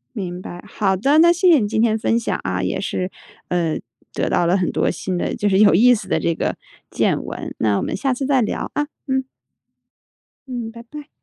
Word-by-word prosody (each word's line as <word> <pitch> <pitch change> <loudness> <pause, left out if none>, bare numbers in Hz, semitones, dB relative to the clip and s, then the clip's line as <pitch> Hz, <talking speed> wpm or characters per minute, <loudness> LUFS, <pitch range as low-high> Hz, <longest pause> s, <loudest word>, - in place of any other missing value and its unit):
明 180 -4 -5
白， 175 -1 -9
好 195 -2 0
的， 275 +10 +2
那 340 +1 +7
谢 360 +1 +3
谢 310 - +6
你 205 - 0
今 220 +1 0
天 220 -1 +3
分 230 +1 +1
享 - - -2
啊， 95 0 -2
也 90 - -1
是， 185 -1 -3 0.4
呃， 170 -3 0 0.4
得 - - -1
到 175 - +2
了 180 +3 +3
很 180 - 0
多 - - +1
新 185 -2 -3
的， - - -2
就 205 - 0
是 190 +1 +3
有 210 -5 +6
意 245 +6 +6
思 215 - -3
的 - - +1
这 170 - +1
个 - - -2 0.3
见 - - +1
闻， - - -6
那 105 -2 +2
我 - - -1
们 - - -2
下 270 -1 0
次 270 +2 -3
再 265 -2 +3
聊， 215 - -2
啊， 295 0 0 0.2
嗯。 265 0 0 1.2
嗯， 240 -3 -5
拜 235 0 -11
拜。 295 +4 -10
215 Hz, 240 characters per minute, -20 LUFS, 180-265 Hz, 1.2 s, 那